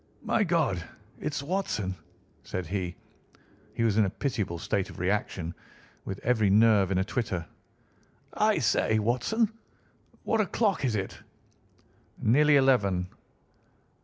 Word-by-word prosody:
"My 220 - +2
God! 160 - +1 0.4
It's 150 -2 -3
Watson," 140 - -2 0.5
said 95 -1 -4
he. 90 0 -3 0.8
He 115 - 0
was 110 -2 +2
in 105 - +5
a - - 0
pitiable 105 -6 -2
state 95 +3 -1
of - - -11
reaction, 90 -2 -1 0.5
with 95 - -4
every 110 -4 +2
nerve 105 -2 +5
in 95 - 0
a 95 - +2
twitter. 95 -6 -2 0.9
"I - - +2
say, 110 - +2
Watson, 125 - +1 0.7
what 225 - +2
o'clock 200 -4 0
is 120 -4 0
it?" 95 -2 -4 1.0
"Nearly 150 +6 +4
eleven." 100 -10 +3
110 Hz, 125 wpm, -28 LUFS, 95-140 Hz, 1.0 s, in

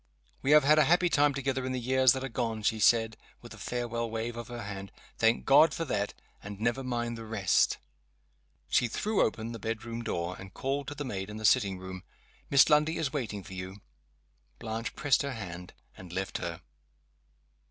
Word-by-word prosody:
"We 135 - -2
have 150 0 +7
had 150 +2 +5
a - - +5
happy 175 +1 +3
time 145 -2 +4
together 135 -1 -1
in 130 0 -2
the 130 - -2
years 130 +1 +4
that 130 0 -4
are - - -2
gone," 115 -3 -3
she 110 +1 +1
said, 110 0 +3 0.3
with - - -10
a - - -13
farewell 120 -1 -3
wave 115 +1 -3
of 120 -1 -6
her 120 -1 -6
hand. 100 -1 -7 0.3
"Thank 115 +1 +3
God 150 +3 +6
for 165 - -2
that! 105 -6 -2 0.3
And 100 0 -8
never 120 +4 0
mind 120 -2 -3
the - - -7
rest." 110 -4 +2 0.9
She 125 - +2
threw 210 - 0
open 110 +1 -1
the 115 - -7
bedroom 115 +2 -4
door, 90 -5 -3
and 95 -1 -11
called 135 +1 -2
to 145 - -5
the 145 - -5
maid, 95 -5 -4
in 105 - -7
the 110 - -4
sitting 100 -5 +3
room. 95 0 -8 0.5
"Miss 140 -1 +6
Lundie 150 +1 +3
is 155 -3 -2
waiting 110 -8 -3
for 95 - -11
you." 95 +2 -7 0.8
Blanche 115 +1 -5
pressed 145 -3 +2
her 140 -1 -3
hand, 90 -5 -7 0.2
and 90 -2 -11
left 95 -1 -3
her. - - -5
115 Hz, 200 wpm, -30 LUFS, 105-135 Hz, 0.9 s, have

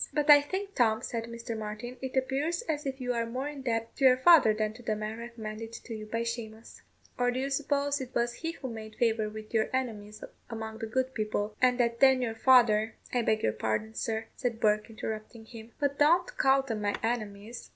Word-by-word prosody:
"But 295 0 +4
I 290 0 +9
think, 390 +7 -4
Tom," 220 - +2
said 230 -1 -3
Mr. 230 0 -6
Martin, 215 +3 -6
"it 265 0 -4
appears 280 - 0
as 300 -9 -3
if 270 0 -4
you 250 -1 -1
are 230 -1 -1
more 255 +4 -3
indebted 245 -6 -3
to 275 - +2
your 255 -1 +7
father 300 -4 +7
than 215 0 -1
to 235 - -13
the 215 -2 -1
man 215 +1 -5
recommended 225 -1 -7
to 230 - -8
you 215 -1 -7
by 230 +2 -2
Shamous; 230 -1 -6 0.4
or 245 0 +3
do 245 +1 -1
you 275 +1 -2
suppose 285 0 0
it 255 - -5
was 240 0 +1
he 330 +4 -4
who 275 - -7
made 220 -1 -8
favour 225 -2 +1
with 215 +1 -10
your 220 -1 +2
enemies 215 -5 -4 0.3
among 220 -1 -6
the 225 - -4
good 260 +3 -1
people, 215 -1 -2
and 250 0 +4
that 235 -1 +1
then 265 0 +6
your 225 -2 -1
father 225 -3 +4
" - - -21
"I 245 - +2
beg 220 -1 +1
your 110 - +2
pardon, 110 - -2
sir," 220 0 -2
said 240 -3 -2
Bourke, 210 0 +2
interrupting 220 0 -6
him; 225 0 -11
"but 285 -1 -1
don't 335 +4 +3
call 270 0 +4
them 225 -5 -4
my 205 -1 0
enemies. 220 -1 -4
235 Hz, 220 wpm, -29 LUFS, 220-260 Hz, 0.4 s, I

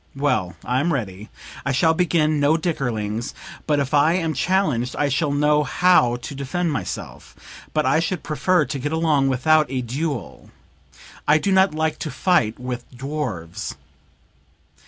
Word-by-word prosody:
Well, 95 -11 0
I'm 130 +8 +1
ready. 105 - -4 0.3
I 140 - -1
shall 160 +5 +3
begin 160 -3 +1
no 145 +3 +3
dickerings, 120 - -2 0.3
but 150 -2 +2
if 140 +1 -2
I 150 +3 +4
am 165 -3 0
challenged 155 -12 0
I 145 - +1
shall 145 +3 0
know 150 +1 +3
how 145 -4 +3
to 120 +3 -7
defend 150 +5 -2
myself. 105 -11 -6 0.4
But 155 -1 0
I 160 - +3
should 170 +1 -2
prefer 155 +2 +1
to 140 - -4
get 145 +3 -3
along 160 -4 +2
without 150 +3 +3
a 130 -1 -2
duel; 135 +2 -4 0.8
I 150 - +6
do 195 +6 -1
not 190 -3 +4
like 160 0 -1
to 155 - -4
fight 135 - +1
with 125 -1 -6
dwarfs." 125 - -5
145 Hz, 155 wpm, -22 LUFS, 125-160 Hz, 0.8 s, I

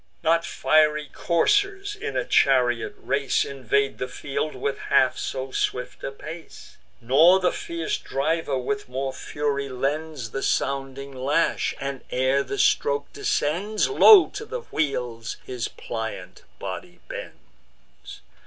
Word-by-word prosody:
Not 165 +1 +3
fiery 150 -2 +2
coursers, 395 - +1
in 430 +1 -4
a - - 0
chariot 125 -4 +3
race, 140 -1 0
Invade 140 +1 -1
the 125 - -2
field 140 +3 -4
with 135 +2 -2
half 130 - +4
so 130 0 -4
swift 125 -1 -2
a - - -3
pace; 155 +4 -11 0.2
Not 160 +10 +5
the 180 - +4
fierce 170 -1 -3
driver 145 0 -1
with 205 +10 -3
more 135 +1 -3
fury 140 +1 -2
lends 140 -1 -3
The 135 - -3
sounding 135 0 -2
lash, 145 +6 +1
and, 135 -1 -4
ere 130 +2 +2
the 140 - -4
stroke 140 0 +1
descends, 200 - 0
Low 410 -2 +8
to 415 - -6
the 470 +2 -5
wheels 120 -6 -2
his 125 -2 -3
pliant 110 -6 -6
body - - -7
bends. - - -12
140 Hz, 130 wpm, -24 LUFS, 130-165 Hz, 0.2 s, Low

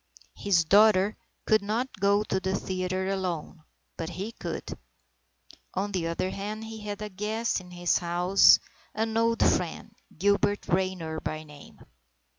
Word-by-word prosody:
His 185 -4 +2
daughter 205 +1 +5 0.3
could 215 -1 +4
not 220 +5 -1
go 200 +1 +3
to 190 - -1
the 190 0 -1
theatre 185 0 -2
alone, 180 -4 -3 0.4
but 165 0 -4
he 190 +6 -5
could. - - -6 1.0
On 200 +2 -1
the 180 -4 -1
other 170 +3 -2
hand, 210 +2 -5
he 220 0 -8
had 210 0 -5
a 210 - -5
guest 210 +2 -2
in 180 - -14
his 175 -1 +1
house, 180 +2 +5 0.4
an 220 +1 -1
old 230 0 +2
friend, 175 -2 -1 0.2
Gilbert 205 +2 +1
Raynor 180 -3 -1
by 155 0 -4
name. 150 -2 -14
190 Hz, 145 wpm, -27 LUFS, 180-210 Hz, 1.0 s, daughter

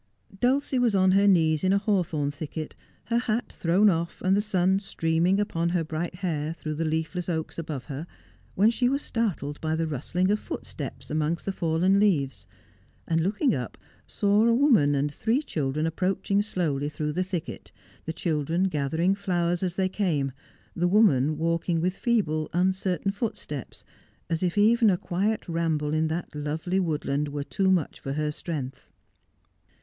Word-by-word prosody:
Dulcie 260 +2 +2
was 235 -4 +2
on 190 -1 +4
her 200 +2 +4
knees 160 -5 +3
in 185 - +3
a 200 - +4
hawthorn 180 -8 0
thicket, 155 +1 -6 0.3
her 235 +1 +1
hat 240 -1 -2
thrown 180 +5 +3
off, 170 -3 0
and 185 +1 +3
the 205 - +3
sun 190 -2 +2
streaming 175 -1 +1
upon 170 -5 0
her 175 -1 0
bright 160 +3 -4
hair 160 -4 -2
through 155 -2 -5
the 160 +2 -2
leafless 160 +3 -2
oaks 160 -1 -3
above 150 -5 -4
her, 145 +3 -6 0.5
when 210 +4 +5
she 245 +1 +1
was 275 +2 -1
startled 175 - -2
by 160 0 0
the 165 0 0
rust 150 0 -6
ling* 185 +2 +3
of 210 - +1
footsteps - - -7
amongst 155 +2 -1
the 195 - 0
fallen 180 +2 +2
leaves, 155 -11 +1 0.6
and 165 0 +2
looking 210 - +1
up 125 -3 -4 0.3
saw 205 +1 +2
a 230 - +4
woman 230 - +4
and 145 +1 0
three 235 - 0
children 150 - -1
approaching 190 +4 0
slowly 155 -9 -1
through 150 0 -3
the 180 +3 0
thicket, 180 -3 -5 0.3
the 160 - -2
children 160 +2 -1
gathering 160 +1 +1
flowers 175 -3 0
as 180 -2 -1
they 190 -1 +1
came, 165 -9 0 0.4
the 175 +1 +1
woman 155 - +4
walking 165 +1 0
with 180 +3 0
feeble, 160 -12 0
uncertain 185 +1 +1
footsteps, 195 - -5 0.5
as 165 - 0
if 180 +1 -1
even 225 +2 +5
a 185 - +2
quiet 200 +6 -1
ramble 160 -3 0
in 155 0 +2
that 160 +1 -4
lovely 155 +5 -2
woodland 150 -4 -1
were 145 0 -4
too 190 +6 0
much 180 -6 +1
for 135 - -4
her 150 +1 -1
strength. 140 -4 -6
170 Hz, 170 wpm, -26 LUFS, 155-195 Hz, 0.6 s, when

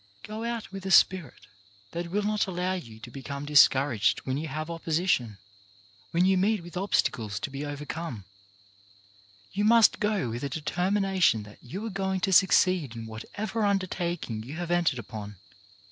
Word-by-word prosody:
Go 215 +1 -6
out 235 -3 -4
with 195 -1 -7
a - - -2
spirit 180 - +3 0.5
that 170 0 -4
will 205 +4 0
not 210 0 +1
allow 180 0 -1
you 115 -12 -7
to 120 - -10
become 140 +2 -6
discouraged 135 -7 +4
when 130 - -1
you 155 +3 -3
have 155 +2 -4
oppo 170 0 -8
sition, 155 - +1 0.7
when 175 +2 +2
you 190 -1 +3
meet 205 -1 +1
with 175 0 -11
obstacles 115 - 0
to 155 - -4
be 140 +1 -5
over 145 0 -5
come. 145 - -5 1.3
You 205 +2 -1
must 230 +1 +5
go 210 - 0
with 120 +3 -5
a 140 - -2
determination 180 - +1
that 105 0 -15
you 190 - -6
are 225 - -4
going 190 0 -1
to 190 0 +1
succeed 185 - +4
in 115 -1 -6
whatever 205 - -4
undertaking 175 - -1
you 130 +7 -8
have 175 0 -4
entered 175 -6 +2
upon. 105 -2 -7
170 Hz, 175 wpm, -28 LUFS, 130-190 Hz, 1.3 s, must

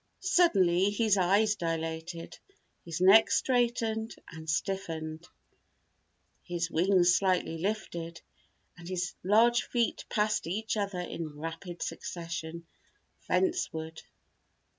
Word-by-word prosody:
Suddenly 195 - +4
his 210 0 +2
eyes 200 +3 +3
dilated, 165 0 -4 0.4
his 170 +1 -5
neck 195 +4 +7
straightened 235 -3 0 0.2
and 160 -1 -9
stiffened, 160 -2 -3 1.1
his 175 -1 -3
wings 180 +1 +4
slightly 185 -4 +1
lifted 170 -4 -3 0.6
and 170 0 -9
his 180 -1 -2
large 230 +5 +4
feet 235 -2 -1
passed 210 -4 0
each 215 +6 -2
other 200 -3 -2
in 160 -4 -6
rapid 165 +3 -6
succession, 170 -1 -6 0.6
fence 370 -1 +1
ward. 160 0 -7
180 Hz, 100 wpm, -30 LUFS, 165-215 Hz, 1.1 s, neck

